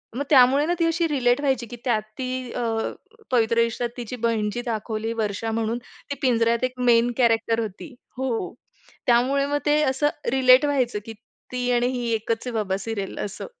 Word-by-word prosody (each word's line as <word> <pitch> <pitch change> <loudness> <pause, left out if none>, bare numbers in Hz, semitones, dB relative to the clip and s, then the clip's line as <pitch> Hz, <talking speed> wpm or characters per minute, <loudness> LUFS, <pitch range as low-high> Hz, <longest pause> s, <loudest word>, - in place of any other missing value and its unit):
मग 285 - -1
त्यामुळे 275 +1 +6
ना, 350 - +1
ती 335 - +3
अशी 330 0 +1
रिलेट 255 -3 +2
व्हायची 265 -4 0
की 240 - -8
त्यात 225 -4 +2 0.2
ती 255 -1 -4
अ, 240 - -3 0.7
"पवित्र 230 -2 +2
रिश्त्यात" 230 +1 +1
तिची 240 +1 -5
बहिण 215 -2 +1
जी 240 - -3
दाखवली 225 0 -3
वर्षा 220 0 -2
म्हणून 225 +1 -1 0.3
ती - - -1
"पिंजऱ्यात" 235 -2 +2
एक 255 0 0 0.2
मेन 235 +1 +4
कॅरेक्टर 230 -2 +2
होती. 220 - -6 0.2
हो. 260 -3 -2 0.5
त्यामुळे 260 +4 +3
मग 290 0 0
ते 300 +1 +3
असं 270 +2 +2 0.2
रिलेट 260 +1 +6
व्हायचं 255 -7 0
की 225 - -7 0.4
ती 250 0 -1
आणि 240 0 +2
ही 245 -2 -2
एकच 225 +2 -2
आहे - - -2
बाबा 195 -3 0
सीरियल 205 -4 -4
असं. 200 - -7
240 Hz, 180 wpm, -24 LUFS, 225-260 Hz, 0.7 s, त्यामुळे